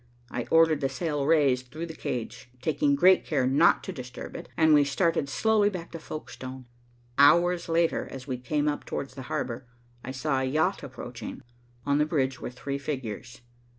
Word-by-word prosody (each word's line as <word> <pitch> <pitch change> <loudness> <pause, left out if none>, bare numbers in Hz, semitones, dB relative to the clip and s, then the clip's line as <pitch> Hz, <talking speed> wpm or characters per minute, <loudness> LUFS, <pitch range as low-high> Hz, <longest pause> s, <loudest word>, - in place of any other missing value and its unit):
I 120 - -3
ordered 160 -2 +4
the 135 - +1
sail 145 -1 -2
raised 135 -5 +3
through 155 +7 -6
the 165 - -8
cage, 120 -5 -5
taking 145 +1 +1
great 185 +6 +5
care 140 -5 0
not 140 +6 +4
to - - -5
disturb 125 -3 -8
it, - - -8
and 160 -1 +5
we 145 -1 +6
started 145 0 +1
slowly 215 +6 +3
back 180 -4 -7
to 165 - -6
Folkestone. 130 -4 -8 0.5
Hours 170 +4 +5
later, 165 0 +1
as 130 -2 -8
we 130 -2 -4
came 145 +4 -1
up 145 - -1
towards 135 -2 -5
the 135 - -8
harbor, 125 +1 -3 0.4
I - - -7
saw 135 +1 -1
a - - -1
yacht 155 +8 +1
approaching. 125 -2 -8 0.4
On 140 0 +2
the 150 - +2
bridge 135 -5 0
were - - -4
three 140 +3 -5
figures. 125 -3 -5
140 Hz, 185 wpm, -27 LUFS, 130-160 Hz, 0.5 s, we